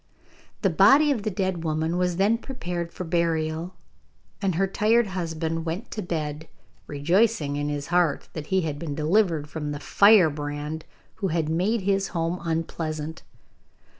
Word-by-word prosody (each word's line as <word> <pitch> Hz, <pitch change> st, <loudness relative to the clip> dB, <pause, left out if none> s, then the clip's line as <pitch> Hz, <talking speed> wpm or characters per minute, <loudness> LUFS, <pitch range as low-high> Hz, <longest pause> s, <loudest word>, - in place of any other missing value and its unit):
The 195 Hz, -, +3 dB
body 275 Hz, -, +6 dB
of 245 Hz, -6 st, 0 dB
the 215 Hz, -, -1 dB
dead 185 Hz, -3 st, -2 dB
woman 160 Hz, +1 st, -1 dB
was 180 Hz, -1 st, 0 dB
then 210 Hz, +4 st, +3 dB
prepared 175 Hz, -11 st, -5 dB
for 185 Hz, -, -6 dB
burial, 165 Hz, 0 st, -1 dB, 0.7 s
and 190 Hz, -4 st, 0 dB
her 195 Hz, +3 st, +2 dB
tired 220 Hz, +4 st, +2 dB
husband 165 Hz, -3 st, -3 dB
went 170 Hz, +8 st, -4 dB
to 215 Hz, -, -4 dB
bed, 155 Hz, -3 st, -4 dB, 0.4 s
rejoicing 165 Hz, +1 st, +1 dB
in 145 Hz, 0 st, -2 dB
his 145 Hz, -1 st, -3 dB
heart 175 Hz, -5 st, +2 dB
that 155 Hz, -2 st, -6 dB
he 190 Hz, -1 st, +2 dB
had 150 Hz, -3 st, -3 dB
been 150 Hz, -3 st, -4 dB
delivered 160 Hz, -1 st, +1 dB
from 150 Hz, 0 st, -5 dB
the 145 Hz, -, -5 dB
firebrand 150 Hz, -4 st, +3 dB, 0.3 s
who 200 Hz, -, -1 dB
had 160 Hz, -3 st, -1 dB
made 195 Hz, +8 st, +1 dB
his 195 Hz, 0 st, +1 dB
home 165 Hz, +2 st, -1 dB
unpleasant. 160 Hz, -1 st, -3 dB
170 Hz, 155 wpm, -25 LUFS, 155-195 Hz, 0.7 s, body